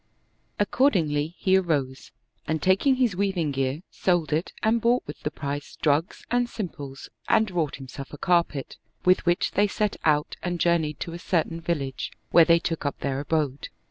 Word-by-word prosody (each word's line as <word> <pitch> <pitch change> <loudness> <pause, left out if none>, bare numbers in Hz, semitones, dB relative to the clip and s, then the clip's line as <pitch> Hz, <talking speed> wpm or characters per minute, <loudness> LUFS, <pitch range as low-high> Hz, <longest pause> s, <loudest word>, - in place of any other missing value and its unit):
Accordingly, 170 - +1
he 190 0 +3
arose 145 -8 -1 0.4
and 160 0 0
taking 195 - +3
his 245 -7 +1
weaving 185 -6 0
gear, 135 +4 -2
sold 170 -5 +1
it 160 +4 -1
and 225 +1 +3
bought 240 +2 +3
with 150 - -8
the - - -1
price 145 -1 -5
drugs 155 +4 0
and 245 0 +2
simples 145 - -6 0.2
and 220 -3 +3
wrought 165 -5 -1
himself 135 +1 -9
a 145 - -8
carpet, 170 -6 0 0.3
with 185 0 +4
which 175 0 +2
they 205 +1 +3
set 210 0 -1
out 150 -1 +1
and 175 -1 -2
journeyed 160 -4 +1
to 170 - -4
a 170 - -6
certain 165 -1 -1
village, 140 -6 -2 0.2
where 170 - +7
they 170 0 +6
took 165 -1 -3
up 145 - -3
their 135 -1 -1
abode. 145 -2 -1
165 Hz, 175 wpm, -26 LUFS, 145-190 Hz, 0.4 s, where